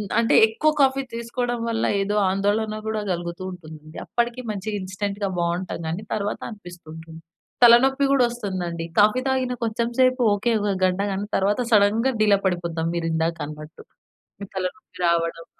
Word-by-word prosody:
హ్మ్. 205 Hz, -, -5 dB
అంటే 230 Hz, -, +2 dB
ఎక్కువ 305 Hz, +8 st, +1 dB
కాఫీ 270 Hz, 0 st, +2 dB
తీసుకోడం 240 Hz, +1 st, -3 dB
వల్ల 225 Hz, -1 st, -1 dB, 0.2 s
ఏదో 205 Hz, +1 st, -1 dB
ఆందోళన 205 Hz, +3 st, 0 dB
గూడా 220 Hz, -1 st, -2 dB
గలుగుతూ 170 Hz, +1 st, -5 dB
ఉంటుంది. 155 Hz, -3 st, -12 dB
అప్పడికి 240 Hz, +1 st, -1 dB
మంచి 205 Hz, +1 st, -6 dB
ఇన్‌స్టంట్‌గా 200 Hz, +1 st, -3 dB
బావుంటాం 170 Hz, +1 st, -2 dB
గానీ, 175 Hz, +7 st, -4 dB
తర్వాత 205 Hz, 0 st, -3 dB
అనిపిస్తుంటుంది. 165 Hz, -5 st, -11 dB, 0.4 s
తలనొప్పి 265 Hz, +4 st, +6 dB
గూడా 270 Hz, -3 st, +4 dB
వస్తుందండి. 185 Hz, -8 st, -4 dB
కాఫీ 215 Hz, +4 st, +5 dB
తాగిన 260 Hz, -1 st, 0 dB
కొంచెం 230 Hz, +1 st, -1 dB
సేపు 255 Hz, 0 st, +3 dB
ఓకే. 215 Hz, +4 st, -1 dB
ఒక 205 Hz, -1 st, 0 dB
గంట 185 Hz, +1 st, +1 dB
కానీ 200 Hz, +2 st, -3 dB
తర్వాత 205 Hz, +4 st, +1 dB
సడెన్‌గ 215 Hz, +2 st, +4 dB, 0.2 s
డీలా 210 Hz, -2 st, +4 dB
పడిపోతాం 170 Hz, -3 st, -1 dB
మీరు 165 Hz, -1 st, -1 dB
ఇందాకన్నట్టు. 160 Hz, -2 st, -4 dB, 0.6 s
ఈ -, -, -5 dB
తలనొప్పి 185 Hz, +1 st, -6 dB
రావడం 165 Hz, 0 st, 0 dB
200 Hz, 145 wpm, -23 LUFS, 170-230 Hz, 0.6 s, తలనొప్పి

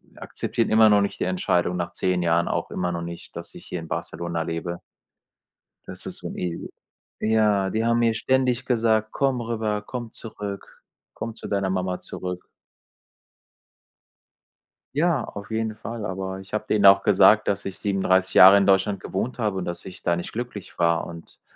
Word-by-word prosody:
akzeptieren 115 Hz, -, -2 dB
immer 110 Hz, 0 st, +6 dB
noch 105 Hz, -1 st, +5 dB
nicht 100 Hz, -, -3 dB
die -, -, +3 dB
Entscheidung 90 Hz, -1 st, 0 dB
nach 85 Hz, -1 st, -3 dB
10 90 Hz, -1 st, 0 dB
Jahren 85 Hz, 0 st, +2 dB
auch -, -, -2 dB
immer 90 Hz, -1 st, -2 dB
noch 85 Hz, -1 st, -3 dB
nicht, 85 Hz, 0 st, -8 dB
dass -, -, -6 dB
ich -, -, -10 dB
hier 90 Hz, -, -5 dB
in 80 Hz, -, -8 dB
Barcelona 85 Hz, +1 st, -3 dB
lebe. 85 Hz, +1 st, -4 dB, 1.1 s
Das -, -, -9 dB
ist -, -, -5 dB
so -, -, -6 dB
'n -, -, -7 dB
e 90 Hz, -, -2 dB, 0.7 s
ja, 105 Hz, -3 st, +3 dB
die 110 Hz, +2 st, -1 dB
haben 115 Hz, 0 st, +2 dB
mir 115 Hz, -1 st, +3 dB
ständig 130 Hz, +1 st, +1 dB
gesagt: 110 Hz, -3 st, +1 dB
„Komm 135 Hz, -3 st, +1 dB
rüber, 110 Hz, -3 st, -2 dB
komm 120 Hz, +1 st, -6 dB
zurück, 105 Hz, -3 st, -8 dB, 0.3 s
komm 115 Hz, -, -5 dB
zu -, -, -8 dB
deiner 100 Hz, -2 st, 0 dB
Mama 95 Hz, -1 st, -2 dB
zurück.“ 90 Hz, -1 st, -6 dB, 2.5 s
Ja, 155 Hz, -2 st, +2 dB
auf 100 Hz, -1 st, -9 dB
jeden 110 Hz, -1 st, -1 dB
Fall, 115 Hz, -1 st, -6 dB
aber 95 Hz, 0 st, -4 dB
ich 95 Hz, +2 st, -11 dB
habe 105 Hz, -, -1 dB
denen 105 Hz, -2 st, +4 dB
auch 100 Hz, 0 st, +8 dB
gesagt, -, -, +5 dB
dass -, -, -1 dB
ich 95 Hz, -, -5 dB
37 95 Hz, -2 st, +1 dB
Jahre 95 Hz, +2 st, +10 dB
in 100 Hz, -, +3 dB
Deutschland 95 Hz, 0 st, +3 dB
gewohnt 120 Hz, +8 st, -3 dB
habe 105 Hz, -5 st, -1 dB
und 90 Hz, -, -4 dB
dass 85 Hz, -, -5 dB
ich 90 Hz, -1 st, -10 dB
da 85 Hz, -1 st, +1 dB
nicht 85 Hz, -, -5 dB
glücklich 120 Hz, -4 st, -6 dB
war. 85 Hz, 0 st, +2 dB
Und 85 Hz, -1 st, -11 dB
100 Hz, 180 wpm, -24 LUFS, 90-110 Hz, 2.5 s, Jahre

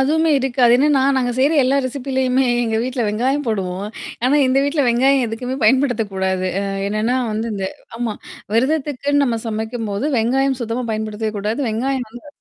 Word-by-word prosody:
அதுவுமே 320 Hz, +4 st, +2 dB
இருக்கு. 260 Hz, -1 st, -1 dB
என்னன்னா, 280 Hz, 0 st, +3 dB
நாங்க 250 Hz, -2 st, +1 dB
செய்ற 275 Hz, +4 st, +3 dB
எல்லா 270 Hz, +2 st, +2 dB
ரெசிபிலயுமே 260 Hz, 0 st, 0 dB, 0.2 s
எங்க 225 Hz, -1 st, -1 dB
வீட்ல 250 Hz, 0 st, -2 dB
வெங்காயம் 260 Hz, +7 st, 0 dB
போடுவோம். 195 Hz, -3 st, -2 dB, 0.4 s
ஆனா, 265 Hz, +3 st, +3 dB
இந்த 260 Hz, +1 st, +2 dB
வீட்ல 285 Hz, +1 st, +1 dB
வெங்காயம் 260 Hz, +2 st, +3 dB
எதுக்குமே 250 Hz, +4 st, -4 dB
பயன்படுத்தக்கூடாது. 205 Hz, -7 st, +1 dB
அ -, -, -2 dB, 0.3 s
என்னன்னா 215 Hz, +4 st, 0 dB, 0.2 s
வந்து 220 Hz, +2 st, -2 dB
இந்த 195 Hz, -1 st, -3 dB, 0.3 s
ஆமா 235 Hz, -3 st, -2 dB, 0.4 s
விரதத்துக்குன்னு 285 Hz, +2 st, +1 dB
நம்ம 235 Hz, -4 st, 0 dB
சமைக்கும்போது, 220 Hz, 0 st, -3 dB
வெங்காயம் 265 Hz, +3 st, +1 dB
சுத்தமா 235 Hz, +2 st, -3 dB
பயன்படுத்தவே 215 Hz, 0 st, -3 dB
கூடாது. 215 Hz, +6 st, -2 dB
வெங்காயம் 250 Hz, +2 st, -2 dB
வந்து 240 Hz, +6 st, -12 dB
245 Hz, 150 wpm, -19 LUFS, 220-270 Hz, 0.4 s, என்னன்னா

